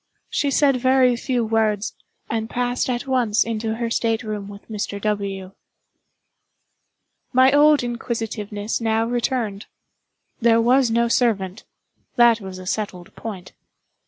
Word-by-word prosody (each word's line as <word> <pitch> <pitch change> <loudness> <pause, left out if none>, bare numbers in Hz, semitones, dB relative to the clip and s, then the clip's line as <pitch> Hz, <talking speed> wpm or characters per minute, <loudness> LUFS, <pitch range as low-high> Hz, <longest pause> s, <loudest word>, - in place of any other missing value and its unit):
She 285 - +1
said 275 -1 +3
very 255 0 +3
few 240 0 -1
words, 215 -2 0 0.3
and 225 0 -3
passed 245 +1 -1
at 245 +2 -2
once 245 -5 +2
into 225 -1 -3
her 230 0 -3
state 225 -1 0
room 210 -2 -5
with 200 0 -12
Mr. 205 -2 -4
W. 200 -2 -3 1.8
My 260 +1 +5
old 295 0 +5
inquisitiveness 225 -3 -3
now 225 0 +1
returned. 235 -4 -2 0.7
There 230 -1 +4
was 245 +2 +4
no 235 +1 +2
servant—that 230 +1 0
was 190 -1 -7
a 185 - -9
settled 185 -3 -4
point. 195 -5 -8
225 Hz, 125 wpm, -22 LUFS, 210-245 Hz, 1.8 s, My